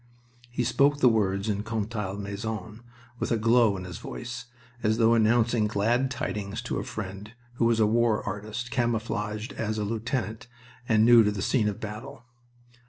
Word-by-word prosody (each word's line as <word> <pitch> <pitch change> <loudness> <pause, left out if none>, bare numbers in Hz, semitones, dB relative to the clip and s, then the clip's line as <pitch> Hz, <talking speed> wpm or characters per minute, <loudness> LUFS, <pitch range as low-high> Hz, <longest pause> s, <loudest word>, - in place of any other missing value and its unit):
He 120 0 -1
spoke 140 +4 +3
the 130 - +5
words 100 -3 +2
in 105 -1 0
Contalmaison 105 -1 -4 0.4
with - - -2
a 115 - +3
glow 115 -2 +4
in 90 - -6
his 90 -1 -7
voice, 120 -1 -7 0.4
as 110 0 +1
though 115 0 +5
announcing 115 0 +3
glad 115 +6 +1
tidings 105 -5 -4
to - - -2
a - - -3
friend 100 +1 -7 0.2
who 115 - +2
was 115 -1 +3
a 110 - +5
war 115 0 +2
artist 110 +4 -5
camouflaged 115 -3 -2
as 110 -1 -2
a 105 - -1
lieutenant 115 +1 -3 0.4
and 110 -1 +5
new 120 -1 +8
to 105 - +2
the 100 -1 -3
scene 115 -6 +2
of 100 - -6
battle. 115 +5 -7
110 Hz, 170 wpm, -27 LUFS, 105-120 Hz, 0.4 s, new